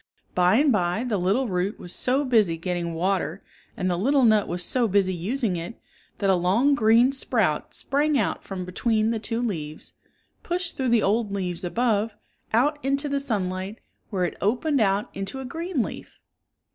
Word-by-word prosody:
By 180 +2 +4
and 285 +3 +4
by 180 0 +1
the 225 -6 -1
little 200 +9 +1
root 185 +1 -1
was 175 - -7
so 270 +3 0
busy 215 -10 +3
getting 170 -1 -3
water 185 +3 -1 0.3
and 185 - -1
the 175 -1 0
little 270 +6 +3
nut 215 -2 +4
was 175 0 -3
so 245 -3 +1
busy 195 -2 +2
using 200 +2 -1
it, 170 +7 -7 0.4
that 200 - 0
a - - +5
long 195 +11 +3
gr.een 235 +1 +5
sprout 220 - 0
sprang 295 +2 +1
76 - - +3
out - - -4
ffom 185 -2 -5
between 220 +4 +1
the 225 - -1
two 230 +2 -3
leaves, 155 -9 -4 0.5
pushed 350 0 -3
through 260 -2 -1
the 235 -2 +3
old 210 +1 +1
leaves 180 -3 -3
above, 220 +2 0 0.4
out 290 +6 +2
into 275 +2 0
the 280 0 0
sunlight, 195 -5 -2 0.3
where 185 -4 0
it - - -4
opened 255 - +1
out 200 0 +1
into 195 +7 -5
a 265 - -6
green 330 -1 -2
leaf. - - -8
215 Hz, 185 wpm, -25 LUFS, 185-255 Hz, 0.5 s, a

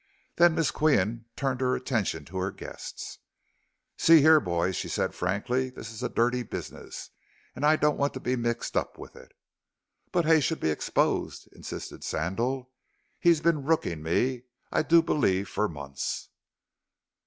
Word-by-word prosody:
Then 170 -1 +6
Miss 165 - +1
Qian 115 -7 +1
turned 135 -2 -1
her 125 0 +2
attention 110 - -2
to 95 +5 -8
her 95 +1 0
guests: - - -8 0.8
"See 165 -1 +7
here, 155 +1 +7
boys," 90 - -1
she - - -3
said - - -1
frankly, 120 +8 -1
"this 115 -3 -9
is 110 - -9
a - - -1
dirty 125 +2 +1
business, - - -8 0.4
and 135 - -6
I 150 +1 +6
don't 150 -1 +1
want 140 -1 0
to - - -4
be 130 0 -1
mixed 120 -1 -2
up - - -1
with - - -11
it." - - -15 0.8
"But 175 -2 +1
Hay 160 0 +6
should 155 +3 -1
be 80 - +1
exposed," 75 - -1
insisted - - -8
Sandal; 125 +10 -2 0.5
"he's 170 -3 +4
been 165 -2 +2
rooking 135 - 0
me, 120 +10 0 0.3
I - - +2
do 165 +1 +5
believe, 100 - +1
for 105 - 0
months." 70 -4 -5
125 Hz, 160 wpm, -28 LUFS, 95-150 Hz, 0.8 s, See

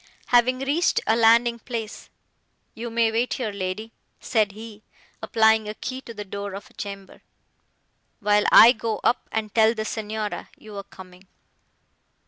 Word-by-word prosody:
Having 255 +1 +3
reached 290 +6 +1
a 220 - +3
landing 235 +1 +4
place, 225 -3 -7 0.6
"You 235 +1 -6
may 230 -1 +1
wait 235 +3 0
here, 230 -5 -3
lady," 200 +3 -5 0.3
said 215 -4 0
he, 215 0 -11 0.4
applying 220 -1 +3
a 210 - -6
key 260 +3 -6
to 235 - -10
the 210 0 -7
door 200 0 -6
of 200 - -10
a - - -23
chamber, 200 -1 -9 1.0
"while 210 0 +2
I 230 - +9
go 225 -3 -3
up, 245 - 0
and 215 -2 -3
tell 225 0 +4
the 215 -1 -3
Signora 215 -1 -4
you 215 -1 -12
are 200 - -4
coming." 185 -1 -15
220 Hz, 155 wpm, -24 LUFS, 205-235 Hz, 1.0 s, I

